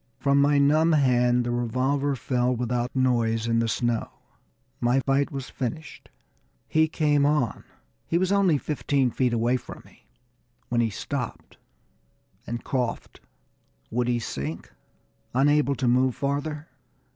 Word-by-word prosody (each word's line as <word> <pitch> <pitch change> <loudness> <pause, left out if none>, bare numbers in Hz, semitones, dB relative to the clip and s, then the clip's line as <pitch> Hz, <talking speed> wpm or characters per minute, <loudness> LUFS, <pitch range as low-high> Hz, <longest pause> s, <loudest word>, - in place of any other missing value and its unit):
From 140 0 +2
my 145 0 +3
numb 155 +4 +4
hand 125 -4 +3
the 120 - -2
revolver 130 +4 0
fell 125 0 0
without 120 +1 -2
noise 115 -3 +1
in 115 0 +1
the 115 - +1
snow 120 0 -1 0.7
my 120 +2 +2
fight 135 +1 +1
was 135 -2 -6
finished. 150 +5 -6 0.6
He 160 0 +3
came 150 -2 +1
on; 145 -6 +1 0.4
he 165 - +1
was 185 +2 +1
only 195 -6 +3
fifteen 140 -3 0
feet 125 0 0
away 120 +2 +1
from - - -11
me, - - -22 0.6
when 120 -1 +1
he 115 - +1
stopped 125 +4 -6 0.9
and 120 0 -4
coughed. 125 -3 -3 0.7
Would 120 +1 0
he 120 -1 +1
sink, 75 - -5 0.6
unable 140 +1 +3
to 130 - -1
move 125 +1 +3
farther? 145 +2 -3
130 Hz, 135 wpm, -25 LUFS, 120-145 Hz, 0.9 s, numb